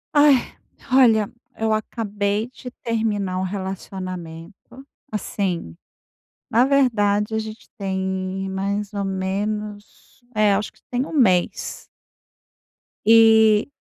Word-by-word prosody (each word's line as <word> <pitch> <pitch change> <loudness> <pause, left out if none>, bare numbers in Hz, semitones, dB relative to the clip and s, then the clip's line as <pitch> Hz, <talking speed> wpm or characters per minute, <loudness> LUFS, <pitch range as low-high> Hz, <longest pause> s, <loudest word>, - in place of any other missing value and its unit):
Ai, 290 -3 +4 0.4
olha 225 -5 +5 0.3
eu 220 0 +1
acabei 210 -1 -2
de 255 - -9
terminar 210 -5 -1
um - - -1
relacionamento, 185 +2 -7 0.3
assim, 185 - -3 0.8
na 235 +3 +4
verdade 220 -6 +2
a - - +1
gente 220 0 -7
tem 190 -1 -3
mais 200 +2 -3
ou 200 -1 -2
menos, 205 +4 -4
é, 210 -1 +4
acho 210 +2 -2
que - - -27
tem 250 +1 0
1 - - -9
mês. 190 - +1 1.2
E 220 -1 +6
205 Hz, 105 wpm, -22 LUFS, 190-225 Hz, 1.2 s, E